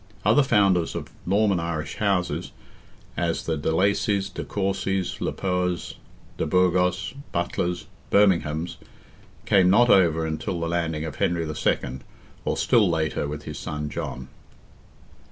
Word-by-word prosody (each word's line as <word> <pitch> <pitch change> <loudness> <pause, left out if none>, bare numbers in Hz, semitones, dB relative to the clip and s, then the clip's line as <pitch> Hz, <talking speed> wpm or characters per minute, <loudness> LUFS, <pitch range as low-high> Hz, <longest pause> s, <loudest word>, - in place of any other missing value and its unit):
Other 110 +7 +5
founders 100 - +2
of - - -5 0.2
Norman 100 -2 +3
Irish 85 -2 -4
houses, 90 -5 0 0.6
as 85 -1 -1
the 80 - 0
de 75 +1 -1
Lacies, 100 +2 +1
de - - -4
Courcies, 95 -1 -2
le - - 0
Poers, 90 -2 -2 0.4
de - - -1
Burgos, 90 0 +2 0.2
Butlers, 85 0 -2 0.2
Berminghams, 85 -5 +2 0.7
came 95 -2 +4
not 120 +5 +5
over 80 -4 +4
until 80 +3 -3
the 85 - -2
landing 80 -2 -1
of 75 -4 -6
Henry 85 -2 0
II., 70 -4 -1 0.5
or - - 0
still 110 -6 +4
later, 80 -3 -1
with 75 0 -6
his - - -7
son 75 -1 -4
John. 65 -6 -5
85 Hz, 135 wpm, -25 LUFS, 80-95 Hz, 0.7 s, Other